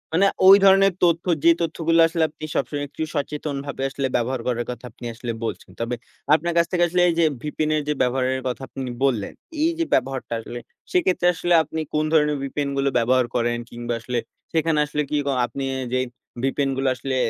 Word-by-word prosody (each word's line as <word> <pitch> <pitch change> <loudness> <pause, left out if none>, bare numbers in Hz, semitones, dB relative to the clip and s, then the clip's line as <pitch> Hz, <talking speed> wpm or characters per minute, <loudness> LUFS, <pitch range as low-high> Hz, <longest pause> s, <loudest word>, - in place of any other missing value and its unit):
মানে 195 +3 +4 0.2
ওই 195 - +11
ধরনের 195 0 +6
তথ্য 170 0 +3 0.2
যে 170 - +7
তথ্যগুলো 165 0 +1
আসলে 165 -1 0
আপনি 155 0 -8
সবসময় 145 +2 -1
একটু 150 - -9
সচেতনভাবে 145 -1 -3
আসলে 135 -1 -2
ব্যবহার 120 +1 0
করার 120 -1 -1
কথা 125 +1 -9
আপনি 120 0 -11
আসলে 120 0 -5
বলছেন। 115 - -5
তবে 120 +1 -2 0.4
আপনার 170 +2 +2
কাছ 170 - +5
থেকে 175 -1 +2
আসলে 180 +1 +1
এই - - +1
যে 165 - +5 0.2
VPN 155 +1 -2
এর 150 - +1
যে - - +3
ব্যবহারের 130 +1 +1
কথা 125 +1 -3
আপনি 130 -2 -6
বললেন, 120 -7 0 0.3
এই 335 - +3
যে 330 - +2
ব্যবহারটা 130 -2 0
আসলে 120 +2 -7 0.3
সেক্ষেত্রে 185 - +2
আসলে 175 +1 0
আপনি 160 +2 -5
কোন 155 0 +1
ধরনের 150 -2 +3
VPN 140 +1 -2
গুলো 135 0 +2
ব্যবহার 125 +1 +3
করেন? 120 0 +1
কিংবা 120 0 -4
আসলে 120 +1 -2 0.3
সেখানে 160 -1 +2
আসলে 150 0 -2
কি 150 - 0
ক - - -4 0.2
আপনি 135 +2 -6 0.3
যেই 130 0 +1 0.4
VPN 135 0 0
গুলো 135 0 0
আসলে 130 +2 -3
140 Hz, 195 wpm, -23 LUFS, 125-165 Hz, 0.4 s, ওই